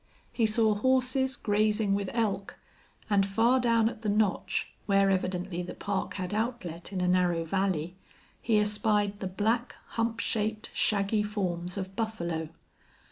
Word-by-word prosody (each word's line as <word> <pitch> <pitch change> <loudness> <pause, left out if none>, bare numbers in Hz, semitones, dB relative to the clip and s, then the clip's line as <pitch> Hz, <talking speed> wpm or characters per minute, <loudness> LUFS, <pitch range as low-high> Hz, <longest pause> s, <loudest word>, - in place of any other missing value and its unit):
He 225 -3 +2
saw 215 0 +3
horses 260 +3 +2
grazing 210 -1 +1
with 200 -1 -1
elk, 200 -4 -1 0.5
and 200 -2 +3
far 225 +6 +3
down 230 -2 +3
at 225 -1 -5
the 215 - -1
notch, 205 -1 0 0.2
where 195 -1 +4
evidently 185 -1 -1
the 180 - -6
park 200 -1 -3
had 185 +1 -4
outlet 215 -7 -3
in 190 -2 -2
a 180 - +1
narrow 180 -2 +2
valley, 180 -1 -1 0.5
he 225 -2 +2
espied 210 -1 +1
the 190 - -3
black, 225 +6 -1
hump 230 0 -1
shaped, 215 0 -1
shaggy 205 0 +1
forms 180 -4 -2
of 190 0 -5
buffalo. 170 -8 -2
205 Hz, 145 wpm, -29 LUFS, 185-220 Hz, 0.5 s, where